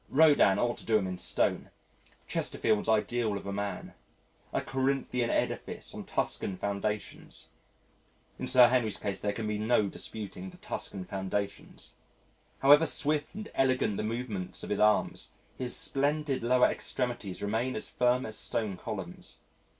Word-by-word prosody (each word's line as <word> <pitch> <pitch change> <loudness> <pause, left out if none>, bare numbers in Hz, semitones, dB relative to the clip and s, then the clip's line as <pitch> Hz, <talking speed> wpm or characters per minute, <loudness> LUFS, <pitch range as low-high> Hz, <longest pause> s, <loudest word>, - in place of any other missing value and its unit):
Rodin 145 -10 +6
ought 120 +3 0
to - - -8
do 110 -1 +5
him 100 - -1
in 90 -1 -4
stone - - 0 0.6
Chesterfield's 105 0 0
ideal 110 0 +1
of 100 - -8
a 100 - -3
man 100 0 -4 0.6
a - - 0
Corinthian 130 -2 0
edifice - - -2
on - - -7
Tuscan 95 - -1
foundations. 100 +2 -4 0.9
In - - -3
Sir 125 -1 +7
Henry's 120 -4 +1
case 100 -1 -3
there 105 - 0
can 110 +2 -4
be 105 0 -1
no 110 -1 +3
disputing 95 -3 -6
the - - -14
Tuscan 95 -2 -5
foundations. 100 +1 -4 0.7
However 145 +4 +8
swift 150 +3 0
and 215 +1 -7
elegant 130 -6 +2
the - - -1
movements 110 -4 -3
of - - -5
his 105 - 0
arms, 105 0 +2 0.3
his 125 -2 -1
splendid 145 0 +1
lower 125 +1 +4
extremities 120 -8 -2
remain 115 +5 0
as 110 - -4
firm 125 +1 +2
as 110 - -6
stone 105 -5 -2
columns. - - -7
110 Hz, 150 wpm, -30 LUFS, 100-130 Hz, 0.9 s, However